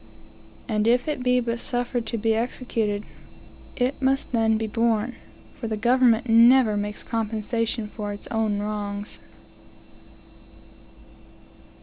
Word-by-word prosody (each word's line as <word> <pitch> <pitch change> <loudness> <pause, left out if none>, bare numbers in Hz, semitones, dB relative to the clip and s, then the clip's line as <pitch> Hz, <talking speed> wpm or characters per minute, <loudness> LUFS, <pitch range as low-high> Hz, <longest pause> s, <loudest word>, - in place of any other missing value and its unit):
And 215 -2 0
if 245 +3 +3
it 300 -4 -2
be 250 0 +3
but 235 -1 -2
suffered 245 -1 -1
to 230 - -2
be 225 +1 +1
executed, 225 -3 -2 0.7
it 255 +2 -1
must 270 +1 +1
then 225 -2 +2
be 220 - -2
borne; 230 +1 0 0.4
for 230 - -6
the 220 -1 -2
government 240 +1 +3
never 230 0 +6
makes 205 0 -4
compensation 225 0 -2
for 210 -1 -5
its 205 - -7
own 220 -2 0
wrongs. 205 0 -4
225 Hz, 120 wpm, -24 LUFS, 215-245 Hz, 0.7 s, never